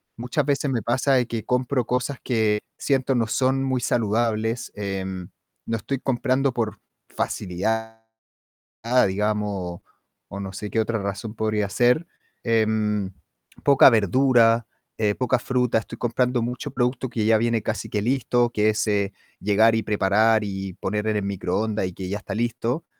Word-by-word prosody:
muchas 125 +5 -1
veces 140 0 0
me 120 -3 0
pasa 130 +4 +1
de 125 -2 +2
que 115 -2 -4
compro 125 0 0
cosas 125 +3 -1
que 110 -4 +1 0.2
siento 135 -1 +1
no 115 -2 +1
son 130 +3 +1
muy 130 -2 0
saludables, 115 0 0
em, 95 -3 -4 0.4
no 115 - -1
estoy 135 +5 -3
comprando 135 +1 0
por 110 -4 -2 0.3
facilidad, 110 +5 -3 1.0
digamos, 100 -3 -2 0.5
o 100 - -7
no 95 -1 -6
sé 105 +1 -5
qué 115 - 0
otra 110 +1 0
razón 100 +2 -4
podría 110 -2 0
ser. 125 - +2 0.4
Em, 110 -3 +1 0.5
poca 140 -1 +7
verdura, 115 +1 +4 0.3
eh, 105 -2 +1
poca 130 0 +1
fruta. 125 -2 +1
Estoy 115 +1 -5
comprando 125 +1 +1
mucho 125 +4 -4
producto 125 0 -1
que 115 -3 -1
ya 110 0 +5
viene 115 0 +1
casi - - -3
que 105 - -1
listo, 120 0 +1
que 105 -1 +2
es, 110 +1 0
eh, 100 -1 0 0.3
llegar 110 +3 +4
y 110 - 0
preparar 110 +2 +3
y 95 -2 -4
poner 105 +4 -3
en 110 -1 +1
el 105 - -1
microondas 100 +2 -1
y 90 - -7
que 95 +1 -6
ya 100 - -2
está 105 - -6
listo. 120 +5 -1
110 Hz, 160 wpm, -24 LUFS, 105-125 Hz, 1.0 s, poca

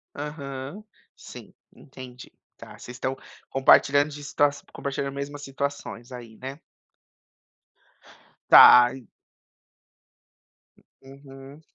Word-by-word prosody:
Aham, 145 +4 -8 0.3
sim, - - -13 0.2
entendi. 125 -2 -13 0.3
Tá! - - -13
Vocês 125 - -11
estão 130 +1 -4 0.3
compartilhando 140 +2 +3
distas 145 0 -1
compartilhando 140 0 -4
a - - -8
mesmas 140 +1 -7
situações 135 -3 -6
aí, 120 -3 -11
né? 135 +3 -9 1.9
Tá. 120 0 +9
En 130 -2 -12 1.9
Uhum. 135 +1 -15
135 Hz, 85 wpm, -24 LUFS, 130-145 Hz, 1.9 s, Tá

